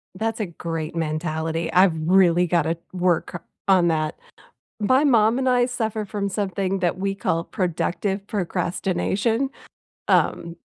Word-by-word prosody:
That's 225 +3 -2
a 215 - 0
great 165 -2 -5
mentality, 160 0 -2
I've 185 -1 +5
really 180 +1 +4
gotta 170 -1 +1 0.2
work 175 -1 0 0.2
on 185 -3 +4
that. 155 -1 -1 0.6
My 260 +7 +3
mom 230 -2 +4
and 260 - 0
I 245 -1 +4
suffer 220 -4 -2
from 200 0 -3
something 195 -1 -2
that 175 0 0
we 195 +1 -2
call 165 -3 -1
"productive 190 +2 -2
procrastination," 195 +6 -1 0.6
um, 170 0 +1
185 Hz, 130 wpm, -23 LUFS, 170-210 Hz, 0.6 s, I've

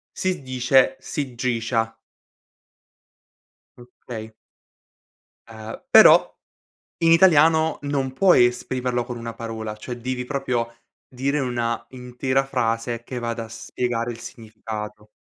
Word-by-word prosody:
si 185 -5 -2
dice 130 0 +2
"sigiscia". 120 -4 -2 1.8
Okay. 120 -2 -10 1.2
Ehm, 110 0 -9
però - - +7 0.6
in 165 -1 +4
italiano 160 -2 +5
non 140 -2 -2
puoi 175 -4 +5
esprimerlo 125 0 -2
con 120 0 -7
1 115 0 -6
parola, 110 -2 -6
cioè 120 +3 -7
devi 125 +1 -4
proprio 125 -4 -2 0.3
dire 135 +3 -1
una 120 -3 -2
intera 130 +1 -2
frase 115 -2 -2
che 125 +1 -6
vada 115 -1 -4
a - - -14
spiegare 120 +1 -3
il 115 - -9
significato. 110 -2 -8
125 Hz, 105 wpm, -23 LUFS, 115-130 Hz, 1.8 s, però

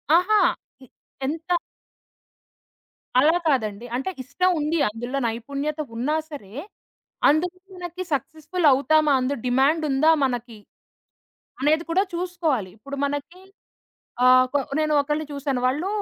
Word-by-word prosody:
ఆహా! 400 +5 +4 0.4
ఇ - - -12 0.4
ఎంత 325 +5 -1 1.6
అలా 310 +5 +5
కాదండి. 225 -6 0
అంటే 265 +8 -2
ఇష్టం 365 +8 +1
ఉంది. 305 +3 0
అందులో 240 +5 -5
నైపుణ్యత 280 +7 -4 0.2
ఉన్నా 265 +7 0 0.2
సరే, 205 -9 -9 0.8
అందులో 345 +5 +1 0.2
మనకి 360 0 -6
సక్సెస్‌ఫుల్ 315 +4 -1
అవుతామా, 300 +3 +3
అందు 255 +2 -1
డిమాండుందా 280 +3 +3
మనకి, 245 -3 -4 1.0
అనేది 310 +3 +3
కూడా 380 +3 +3
చూసుకోవాలి. 330 - -1
ఇప్పుడు 280 +6 -8
మనకి 290 +6 -6 0.8
ఆహ్, 255 0 +7
కొ 285 - +3 0.2
నేను 305 -1 +1
ఒకళ్ళని 295 +2 -1
చూసాను. 280 -2 -2
వాళ్ళు 295 +9 0
290 Hz, 110 wpm, -24 LUFS, 255-320 Hz, 1.6 s, ఆహ్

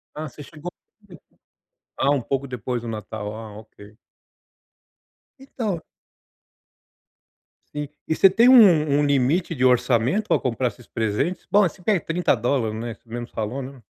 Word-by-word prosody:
Ah, 155 +1 -5
você 145 +2 -12
chegou, 155 +4 -9 1.3
ah, 140 - +2
um 140 -2 +1
pouco 135 +3 -3
depois 125 -1 -4
do 120 - -8
Natal, 105 -1 -6
ah, 110 -2 -9
ok. 105 -1 -16 1.4
Então 220 - -4 1.9
Sim, 150 -1 -3 0.2
e 160 - 0
você 195 - +6
tem 235 +5 +5
um 170 - +6
um 145 - +2
limite 145 +6 +1
de 130 -5 -2
orçamento 125 - +2
pra - - +2
comprar 125 0 -1
esses 120 -3 -16
presentes, 115 - -2
bom, 205 - +6
você 180 -1 -1
quer 200 -1 +2
$30, 125 -8 0
né, 115 -1 -5
você - - -35
mesmo 120 +1 -6
falou, 115 +5 -4
né. 135 0 -9
135 Hz, 145 wpm, -23 LUFS, 115-165 Hz, 1.9 s, você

